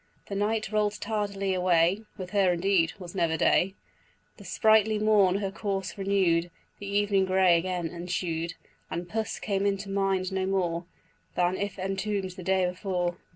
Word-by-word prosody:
The 200 - -3
night 215 +1 0
roll'd 210 -1 0
tardily 200 -3 -2
away, 180 +1 +3 0.2
(With 185 -2 -7
her 195 -3 +3
indeed 175 -2 +2
'twas 180 -3 -9
never 170 -4 +1
day,) 190 +4 +3 0.6
The - - -12
sprightly 220 -1 +3
morn 210 -3 +4
her 195 -1 -1
course 195 -2 -3
renew'd, 190 -4 +1 0.3
The 205 - -7
evening 200 -1 +2
grey 185 -2 +4
again 175 -1 -1
ensued, 170 -1 -3 0.3
And 175 +1 -4
puss 220 +4 -3
came 195 -2 -1
into 200 0 -1
mind 195 -1 0
no 190 0 -1
more 175 -3 -1 0.5
Than 180 +1 +2
if 200 0 -3
entomb'd 195 0 -2
the 185 - -8
day 190 +1 +2
before. 180 -1 -2
190 Hz, 155 wpm, -28 LUFS, 180-200 Hz, 0.6 s, morn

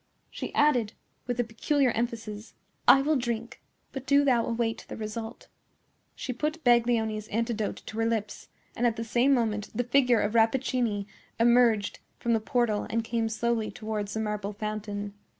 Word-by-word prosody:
She - - -5
added, 255 -8 +3 0.3
with 245 0 -2
a - - +4
peculiar 250 +4 +1
emphasis, 225 -2 -4 0.3
"I 270 - +8
will 305 +2 +2
drink; 235 -2 -4 0.3
but 270 0 -7
do 285 0 +5
thou 245 -4 +3
await 230 -1 -1
the - - -7
result." 220 +2 -6 0.7
She 255 - -4
put 310 +5 -3
Baglioni's 230 -3 +2
antidote 230 -1 -2
to 220 - -7
her 225 - +2
lips; 220 -2 -3 0.3
and, 240 - +2
at 230 - 0
the 230 - -3
same 240 +4 +2
moment, 220 -5 +1
the 245 - +1
figure 250 -1 +3
of 205 - 0
Rappaccini 230 -2 +1 0.3
emerged 235 -3 +3 0.2
from 235 - 0
the 225 - +3
portal 220 -1 0
and 230 0 0
came 230 0 -1
slowly 225 0 -1
towards 215 -2 -4
the - - -1
marble 210 -1 -3
fountain. 205 -1 -4
230 Hz, 165 wpm, -28 LUFS, 215-245 Hz, 0.7 s, I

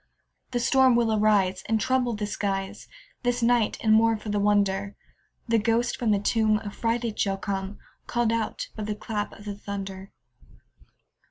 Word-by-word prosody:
The 245 - -1
storm 260 0 +4
will 230 -2 +2
arise, 205 -3 +2
And 225 0 +1
trouble 250 -1 +1
the 210 0 -3
skies 195 -2 -3 0.3
This 245 -1 0
night; 235 -2 +2
and, 215 -1 +4
more 225 0 +4
for 215 0 -8
the 205 0 0
wonder, 200 -1 +1 0.5
The 230 -1 +3
ghost 230 +2 +1
from 235 - -1
the 210 - +4
tomb 215 +1 +2
Affrighted 230 +2 -2
shall 195 -1 +1
come, 195 0 -4 0.3
Call'd 240 -2 +1
out 230 -1 -2
by 220 - -6
the 210 0 -3
clap 210 -1 -4
of 205 - -14
the 205 - -4
thunder. 195 -1 -7
215 Hz, 165 wpm, -26 LUFS, 200-230 Hz, 0.5 s, storm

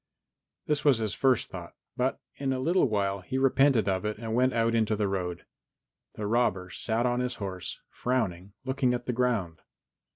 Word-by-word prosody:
This 150 -1 0
was 140 -5 +5
his 110 -4 -1
first 125 +6 +2
thought, - - -8 0.2
but - - 0 0.2
in 135 -1 -1
a 130 - -1
little 165 0 +3
while 100 -2 0
he 130 +8 -3
repented 135 -4 +4
of 95 0 0
it 105 0 -2
and 110 0 -4
went 130 +2 +3
out 115 -1 +1
in 115 -1 +3
the 105 -1 0
road. 90 -3 -3 0.7
The 105 - -4
robber 105 -5 +1
sat 115 +5 0
on 120 0 +1
his 125 0 -1
horse, 95 -3 -5
frowning 120 -9 -1
and 100 - -20
looking 130 -1 +1
at 120 0 -5
the 125 - -1
ground. 115 -9 0
115 Hz, 190 wpm, -28 LUFS, 100-130 Hz, 0.7 s, was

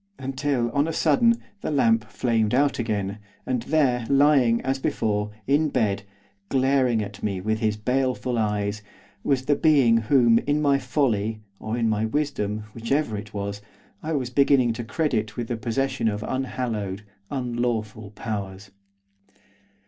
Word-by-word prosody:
Until, 130 -2 -1
on 145 +4 +1
a 165 - -2
sudden, 200 +11 +3 0.3
the - - -3
lamp 225 +10 +3
flamed 115 -2 0
out 140 0 +2
again, 105 -3 -2 0.3
and 125 -2 -1
there, 125 -4 +1
lying, 135 -4 +4
as 135 +1 -1
before, 105 -5 -1 0.2
in 150 +3 +2
bed, 105 -7 0 0.5
glaring 130 -4 +2
at 100 0 -9
me 100 -3 -2
with 110 +3 -1
his 110 -1 0
baleful 125 +1 0
eyes, 105 0 -1 0.4
was 130 -2 +1
the 145 - +3
being 140 -7 +4
whom, 115 0 +4
in 145 +1 +2
my 140 -2 +3
folly, 110 -7 0 0.2
or 110 +2 -3
in 115 -1 +1
my 110 -1 +1
wisdom, 110 -6 -2
whichever 115 +1 -1
it 105 0 -7
was! 100 0 -4 0.4
I 160 - -3
was 130 -4 -2
beginning 135 -3 +4
to 120 +1 -5
credit 115 -4 -1
with 120 -2 -3
the 120 - -1
possession 130 +2 -1
of 105 0 -1
unhallowed, 115 -7 -3 0.3
unlawful 120 -5 -2
powers. 100 -2 -5
120 Hz, 150 wpm, -24 LUFS, 110-135 Hz, 0.5 s, lying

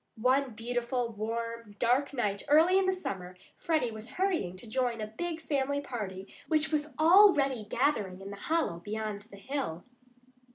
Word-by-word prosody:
One 255 +1 +2
beautiful, 240 +1 -2
warm, 230 0 -4
dark 250 +5 +2
night 210 -7 -1
early 325 +6 +6
in 380 - +1
the - - +4
summer 185 - -5 0.2
Freddie 310 -8 0
was 220 +1 -8
hurrying 345 - 0
to 185 - -11
join 245 0 -1
a 215 - -2
big 325 +10 -4
family 285 -1 0
party 200 -8 -5 0.2
which 310 -1 +1
was 300 -2 -1
already 310 - +5
gathering 215 -6 0
in 195 +1 -8
the - - -6
hollow 305 - -1
beyond 210 +2 -4
the 200 - -12
hill. 225 - -4
245 Hz, 160 wpm, -30 LUFS, 210-295 Hz, 0.2 s, early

